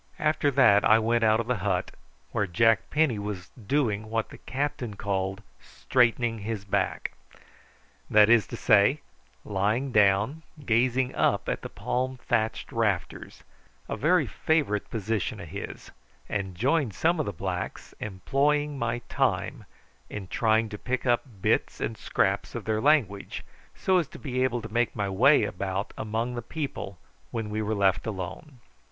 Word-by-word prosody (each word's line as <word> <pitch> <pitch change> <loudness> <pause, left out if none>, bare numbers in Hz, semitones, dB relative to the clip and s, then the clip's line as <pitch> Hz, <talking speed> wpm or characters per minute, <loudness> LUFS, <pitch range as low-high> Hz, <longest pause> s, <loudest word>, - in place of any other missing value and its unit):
After 155 -1 +2
that 125 -7 +5
I 110 - +6
went 115 +1 +1
out 110 0 +4
of 115 - -1
the 125 0 0
hut, 95 -2 -1 0.4
where 105 -4 0
Jack 115 +6 +3
Penny 150 -8 +2
was 100 -3 -5
doing 110 -3 -1
what 115 0 -1
the - - -12
captain 130 -5 -3
called 100 0 -2 0.2
straightening 120 -2 +1
his 105 -1 -4
back 100 - -1 1.0
that 105 -1 +6
is 115 -2 +5
to - - -6
say, 105 +8 +4 0.4
lying 105 +7 0
down 105 +7 +3 0.2
gazing 125 +2 +2
up - - +1
at - - -2
the - - -6
palm 130 +1 -2
thatched 120 -2 -1
rafters, 110 -5 -2 0.4
a - - -3
very - - +3
favourite 145 -11 0
position 110 +1 -2
of 85 -4 -8
his - - -7 0.4
and 95 -3 -3
joined 130 - +1
some 170 +1 +2
of 155 - -1
the - - -1
blacks, 90 0 -5
employing 140 +8 0
my 120 0 -2
time - - -1 0.4
in 100 -2 -6
trying 110 +2 +2
to 105 - -7
pick 130 +1 -2
up 120 -1 +3 0.2
bits - - +1
and 110 - -2
scraps - - -1
of - - -5
their 110 0 0
language, 120 -9 +1 0.3
so 185 -1 +2
as 165 - -2
to - - -12
be 130 -3 -2
able 120 -3 0
to 110 -1 -8
make 120 0 +1
my 100 -1 -1
way 115 +8 +5
about 95 0 -3
among 115 +3 -2
the 120 - -4
people 125 - -5 0.3
when 115 -3 -4
we 110 +1 -1
were 110 +1 -1
left 100 0 +2
alone. 105 - -6
115 Hz, 160 wpm, -27 LUFS, 100-130 Hz, 1.0 s, I